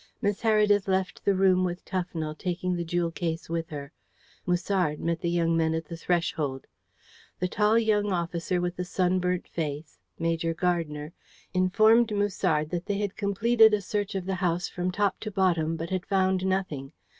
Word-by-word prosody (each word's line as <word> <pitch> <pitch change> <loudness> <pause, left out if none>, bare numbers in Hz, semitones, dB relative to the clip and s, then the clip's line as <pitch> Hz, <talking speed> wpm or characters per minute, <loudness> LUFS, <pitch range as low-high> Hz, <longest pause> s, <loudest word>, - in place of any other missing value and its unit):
Miss 205 -2 -1
Heredith 210 -3 +3
left 190 -1 -1
the 200 - +3
room 185 -1 +4
with 175 0 -3
Tufnell, 170 -4 -3
taking 180 +1 -2
the 170 - -2
jewel 170 0 -1
case 165 -1 -3
with 165 -1 -2
her. 145 -1 -7 0.6
Musard 180 -3 0
met 170 0 -1
the 170 - 0
young 165 -1 +1
men 160 0 +1
at 165 0 -3
the 170 - -7
threshold. 165 -6 -1 0.7
The 180 - -1
tall 210 +4 +2
young 210 -2 +2
officer 175 0 -1
with 175 0 -2
the 180 - -2
sunburnt 180 0 0
face, 155 -1 -5 0.2
Major 165 0 -1
Gardner, 160 -3 -1 0.4
informed 215 +5 +4
Musard 165 -7 0
that 175 +1 -3
they 205 -1 0
had 205 -1 -2
completed 220 +2 +4
a 205 - -3
search 205 +1 -2
of 190 -2 -2
the 190 - -1
house 180 0 0
from 180 0 -3
top 200 +1 0
to 215 - -5
bottom, 170 -5 +1
but 165 +2 -5
had 185 0 -2
found 190 -1 +1
nothing. 160 -7 -2
180 Hz, 175 wpm, -27 LUFS, 165-195 Hz, 0.7 s, room